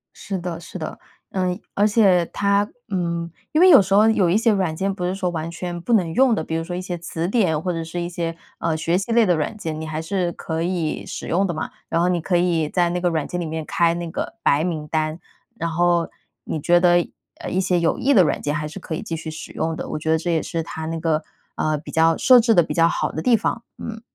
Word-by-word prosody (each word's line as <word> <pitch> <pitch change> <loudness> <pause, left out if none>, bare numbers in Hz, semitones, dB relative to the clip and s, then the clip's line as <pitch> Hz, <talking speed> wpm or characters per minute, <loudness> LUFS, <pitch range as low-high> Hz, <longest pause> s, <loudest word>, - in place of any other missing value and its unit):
是 195 -1 -4
的， 170 -2 -5
是 175 - -9
的， 160 - -6 0.3
嗯， 185 -1 -1
而 205 +1 +3
且 195 -5 +4
它 200 +1 +2 0.2
嗯， 170 -3 -2 0.2
因 310 - +4
为 370 - +8
有 320 - +9
时 195 +1 -1
候 215 +2 +6
有 195 -5 +3
一 185 - +3
些 230 0 +3
软 185 -6 0
件 195 +4 -1
不 180 -2 -4
是 180 +1 -1
说 185 -2 -1
完 165 -1 -4
全 175 +1 -5
不 235 - -1
能 175 -7 +2
用 255 0 +4
的， 160 - -2
比 160 - -4
如 165 - -1
说 175 +2 -5
一 180 - -3
些 180 -1 -4
词 170 0 -4
典 180 -8 +1
或 180 - -1
者 165 -1 -3
是 170 +2 -5
一 175 - -3
些， 165 -1 -3 0.2
呃， 165 -1 0
学 165 +3 0
习 200 +4 -3
类 230 -1 +5
的 180 -3 +3
软 155 +8 -2
件， 160 -5 -4
你 160 - -5
还 155 0 -3
是 180 +1 -1
可 160 0 -4
以 170 -3 -2
使 - - -6
用 190 +3 +1
的 175 - -2
嘛。 155 - -4 0.2
然 165 - +1
后 180 - +2
你 175 -1 +1
可 175 +3 -1
以 170 -3 +1
在 175 -2 +2
那 175 +1 -1
个 175 0 +1
软 160 -3 -1
件 180 - -4
里 170 - -2
面 160 0 -4
开 170 +1 +2
那 170 -1 -4
个 - - -4
白 145 +2 +3
名 155 -4 -3
单， 155 +1 -1 0.4
然 170 - -2
后 175 0 +2 0.3
你 155 - -3
觉 175 +4 +4
得， 175 -1 +4 0.3
呃， - - -5
一 185 - 0
些 180 -1 +1
有 170 - +1
益 280 +2 +2
的 190 -7 +7
软 - - 0
件 145 - -1
还 150 -1 -2
是 160 +6 -8
可 175 - -6
以 - - -4
继 165 - -4
续 160 0 -6
使 155 - -8
用 160 0 -2
的。 - - -5
我 - - -3
觉 160 +1 -1
得 160 - +4
这 170 +2 -2
也 160 - +1
是 165 -1 -3
它 160 0 -6
那 165 0 -3
个， 160 -1 0 0.3
呃， 155 -1 0
比 150 - -11
较 165 0 +3
设 255 -1 +7
置 230 0 +3
得 175 - +6
比 - - -4
较 165 -1 +4
好 - - -1
的 160 - -3
地 230 +4 +4
方， 230 +2 -2
嗯。 225 -1 -7
175 Hz, 295 characters per minute, -22 LUFS, 160-185 Hz, 0.4 s, 有